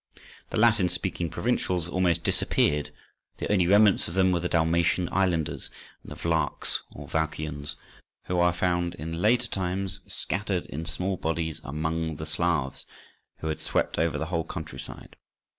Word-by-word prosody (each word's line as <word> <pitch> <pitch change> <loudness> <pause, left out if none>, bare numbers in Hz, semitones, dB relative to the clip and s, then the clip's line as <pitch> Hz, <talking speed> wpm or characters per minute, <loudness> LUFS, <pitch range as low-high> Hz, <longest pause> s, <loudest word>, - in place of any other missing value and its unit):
The - - -2
Latin 110 -4 +5
speaking 90 -1 -2
provincials 90 +2 0
almost 90 -2 +1
disappeared: 75 0 +2 0.5
the - - -2
only 95 -4 +4
remnants 105 +1 +5
of 85 - -6
them 95 -1 +4
were 90 - +2
the 90 +1 -2
Dalmatian 85 +2 +2
islanders 90 -4 0 0.3
and - - -12
the - - -5
"Vlachs" 80 -2 0
or - - -9
Wallachians 75 -2 -2 0.5
who 90 -1 0
are 90 0 +5
found 85 0 0
in 80 +2 -4
later 120 +4 +4
times 95 -1 -2
scattered 100 -2 -2
in 80 +3 -5
small 90 +4 -1
bodies 80 -1 -2
among 80 +3 -2
the 75 - -5
Slavs 80 -4 -1 0.5
who - - -2
had 80 - -3
swept - - 0
over 80 0 +2
the 80 - -2
whole 80 0 +2
country 80 -1 -7
side. - - -10
85 Hz, 160 wpm, -27 LUFS, 80-90 Hz, 0.5 s, Latin